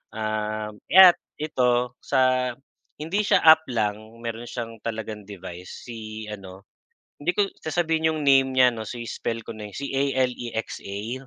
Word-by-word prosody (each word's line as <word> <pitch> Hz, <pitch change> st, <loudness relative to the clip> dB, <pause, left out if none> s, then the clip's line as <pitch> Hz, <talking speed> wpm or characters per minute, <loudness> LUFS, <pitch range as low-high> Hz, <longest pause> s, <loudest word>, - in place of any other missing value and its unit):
ah, 110 Hz, 0 st, -2 dB, 0.2 s
at 185 Hz, -2 st, +10 dB, 0.2 s
ito 125 Hz, -4 st, +1 dB
sa 130 Hz, -2 st, +2 dB, 0.5 s
hindi 170 Hz, +7 st, 0 dB
siya -, -, +4 dB
app 160 Hz, 0 st, +8 dB
lang 105 Hz, -3 st, 0 dB, 0.3 s
meron 115 Hz, 0 st, -5 dB
siyang 115 Hz, -2 st, -5 dB
talagang 110 Hz, -2 st, -4 dB
device 90 Hz, -2 st, -9 dB
si 110 Hz, -2 st, -7 dB
ano, 95 Hz, -1 st, -10 dB, 0.5 s
hindi 180 Hz, -, +1 dB
ko 200 Hz, -1 st, +3 dB, 0.2 s
sasabihin 160 Hz, -1 st, +1 dB
yung 155 Hz, -, -3 dB
name 135 Hz, -1 st, +5 dB
niya 125 Hz, -1 st, +6 dB
ano 110 Hz, -1 st, -5 dB
si-spell 115 Hz, -1 st, -4 dB
ko -, -, -6 dB
na 105 Hz, -, -7 dB
si 140 Hz, +4 st, -4 dB
A-L-E-X-A. 125 Hz, -3 st, -2 dB
120 Hz, 140 wpm, -25 LUFS, 110-135 Hz, 0.5 s, at